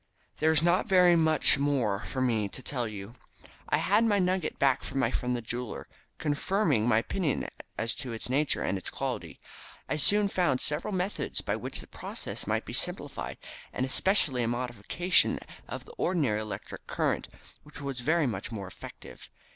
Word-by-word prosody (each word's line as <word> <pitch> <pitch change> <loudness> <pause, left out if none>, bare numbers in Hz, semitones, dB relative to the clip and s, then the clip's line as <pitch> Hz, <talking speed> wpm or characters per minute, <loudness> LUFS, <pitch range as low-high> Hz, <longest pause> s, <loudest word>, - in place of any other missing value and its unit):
"There 160 +1 +3
is 160 0 +3
not 175 +2 +3
very 180 -2 +6
much 160 -3 +5
more 125 -9 +1
for 130 - -3
me 110 -5 +1
to 130 - -7
tell 125 -4 -2
you. 105 +1 -7 0.6
I - - +3
had 230 - +3
my 215 -3 +3
nugget 185 -3 0
back 135 -2 +3
from - - -5
my 135 - +2
friend 125 0 -1
the 120 - -4
jeweller, 120 +1 -5 0.3
confirming 150 - +1
my 115 -3 +4
opinion 150 +6 0 0.3
as 115 - 0
to 125 - -5
its 115 - -3
nature 140 +4 +1
and 95 - 0
its - - -6
quality. - - -4 0.5
I 150 - -1
soon 205 +7 +4
found 175 -9 +1
several 150 +8 0
methods 190 +1 -2
by - - -1
which - - -5
the - - -11
process - - -6
might - - 0
be - - -7
simplified, - - -1 0.3
and 130 - -1
especially 135 -2 +2
a 115 - +1
modification 120 - +2 0.3
of - - -6
the 475 - -12
ordinary 140 - +1
electric 110 -1 -7
current, - - 0 0.3
which 150 - -13
was 140 -2 -4
very 155 +5 +2
much 120 -1 -3
more 100 -4 -5
effective. 95 - -11
140 Hz, 180 wpm, -29 LUFS, 120-175 Hz, 0.6 s, very